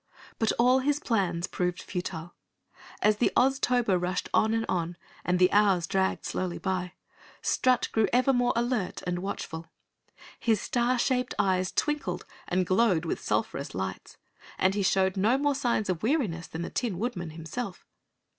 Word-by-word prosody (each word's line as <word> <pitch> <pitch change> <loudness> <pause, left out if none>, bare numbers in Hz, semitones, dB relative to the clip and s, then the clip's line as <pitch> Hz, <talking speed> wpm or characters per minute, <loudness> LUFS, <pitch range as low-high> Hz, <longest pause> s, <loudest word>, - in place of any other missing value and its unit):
But 225 - +2
all 250 +2 +4
his 290 +2 +1
plans 185 - 0
proved 180 -1 -2
futile. 175 -2 -5 0.7
As 210 0 +4
the 240 - +2
Oztober 245 -7 +2
rushed 180 +1 -2
on 220 - +3
and 225 0 0
on, 175 -1 -2 0.3
and 180 0 +1
the 180 0 +4
hours 200 -4 +4
dragged 190 +2 0
slowly 180 -2 -2
by, 185 -2 -2 0.5
Strut 255 -1 +2
grew 220 -1 +3
even 255 +2 +3
more 245 0 +3
alert 235 -4 -1
and 180 0 -1
watchful. 165 -3 -5 0.7
His 225 -4 +2
star 245 +3 +1
shaped 250 0 0
eyes 185 -1 +1
twinkled 295 -1 -1 0.2
and 180 +1 +1
glowed 185 -2 +2
with - - -2
sulphurous - - -2
lights 95 0 -5 0.4
and 190 +1 +3
he 205 - -1
showed 190 0 +2
no 220 +7 +3
more 290 +1 +2
signs 240 -6 0
of 180 -3 -1
weariness 215 - 0
than 165 +1 -5
the - - -5
Tin 230 -8 -2
Woodman 190 -6 -3
himself. 170 +6 -6
195 Hz, 160 wpm, -28 LUFS, 180-245 Hz, 0.7 s, all